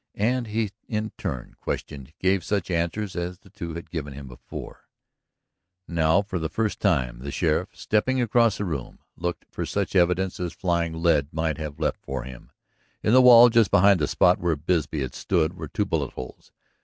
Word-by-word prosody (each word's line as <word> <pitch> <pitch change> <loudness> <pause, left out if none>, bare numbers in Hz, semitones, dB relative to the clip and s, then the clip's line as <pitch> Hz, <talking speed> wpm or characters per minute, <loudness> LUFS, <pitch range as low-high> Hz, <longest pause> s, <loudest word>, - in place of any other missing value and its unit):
And 120 +3 0
he 110 -1 -1 0.2
in 110 0 -2
turn 65 -2 -5
questioned, 70 -1 -5
gave 95 -1 +2
such 100 -2 -1
answers 90 +4 -1
as 90 0 -3
the 95 0 -21
two 85 -2 -6
had 85 -1 -8
given 75 -4 -5
before 60 -1 -10 1.0
him. - - -10
Now 80 +5 +4
for 100 -3 -4
the 80 -1 -2
first 110 +2 -1
time 65 - +1
the 70 +3 -6
sheriff, - - 0
stepping 130 +5 0
across 115 -2 +3
the 100 - -2
room, 75 -8 -5 0.2
looked 85 0 -4
for - - -4
such - - -2
evidence 90 +1 +2
as 90 -2 -3
flying 85 -2 0
lead 75 -5 +3
might 80 -1 -1
have 75 -2 -6
left - - -1
for 65 -2 -4
him. 65 -1 -11 0.5
In 110 - +3
the 130 - +8
wall 120 -1 +9
just 115 -3 +4
behind 100 -1 +5
the 75 - +1
spot 90 +5 +3
where 85 -2 +1
Bisbee 75 -1 -1
had 65 -2 -4
stood 85 -3 0
were 80 -3 -6
two - - -1
bullet - - -2
holes. 65 - -9
85 Hz, 190 wpm, -25 LUFS, 80-100 Hz, 1.0 s, wall